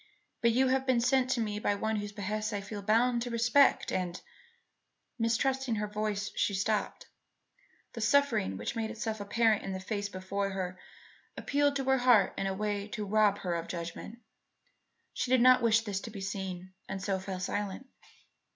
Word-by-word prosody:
But 235 - +4
you 260 +2 +3
have 265 +1 +1
been 255 -2 +3
sent 255 +1 +2
to 260 - +1
me 210 -2 -2
by 205 -1 +1
one 220 +2 -1
whose 205 0 -4
behests 210 +1 -3
I 205 - -2
feel 205 +1 -7
bound 235 +4 +2
to 245 - -3
respect 240 +4 +3
and 180 -1 -2 0.5
" - - -50
Mistrusting 245 +2 +1
her 210 0 -1
voice, 210 -1 -2
she 200 - +1
stopped. 210 +2 -1 0.9
The 230 - -6
suffering 225 - +2
which 105 - -4
made 225 -1 -2
itself 220 -1 -4
apparent 215 +1 +2
in 195 - -5
the 190 - -4
face 205 +1 -3
before 195 +1 -3
her 185 -1 -4 0.6
appealed 285 0 +1
to 275 - -1
her 265 0 +2
heart 240 -6 +4
in 195 - -2
a 195 - -1
way 205 0 -2
to 210 0 -5
rob 205 0 +3
her 180 -2 -2
of 170 -1 -2
her - - -15
judgment. 170 +6 -6 1.0
She 250 - -2
did 255 0 +5
not 255 0 +7
wish 225 -1 +4
this 205 -3 -3
to 225 - -7
be 210 -2 -8
seen, 190 -1 -5 0.2
and 195 - -3
so 190 0 -1
fell 185 0 -5
silent. 205 +5 -3
210 Hz, 190 wpm, -30 LUFS, 195-235 Hz, 1.0 s, not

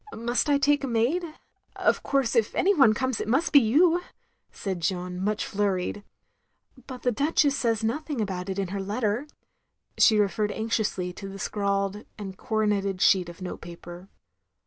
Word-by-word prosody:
Must 235 +4 0
I 285 - +4
take 285 +1 +2
a - - -1
maid? 245 +9 +1 0.5
Of - - +1
course 270 -3 0
if 225 -3 +1
any 400 +2 +3
one 270 - +5
comes, 260 -2 -1
it - - -4
must 270 +9 +1
be 285 - +10
you," 325 +9 +3 0.5
said 190 -3 -4
Jeanne, 180 +1 -2
much 210 +1 -1
flurried. 200 -1 -1 0.8
"But 255 -2 -8
the 245 - +2
Duchess 285 +3 +2
says 230 -4 0
nothing 285 +4 -2
about 190 -3 -3
it 190 - -3
in 195 -2 -2
her 195 +1 -3
letter." 215 +6 -1 0.7
She 220 - +6
referred 210 +1 +1
anxiously 215 -5 -2
to 195 +1 -8
the 195 - -8
scrawled 200 0 -1
and 195 -3 -7
coro 215 +2 -1
neted 200 -2 0
sheet 185 -2 +4
of 170 +2 -10
note 180 - -6
paper. 175 +2 -10
215 Hz, 170 wpm, -26 LUFS, 195-255 Hz, 0.8 s, be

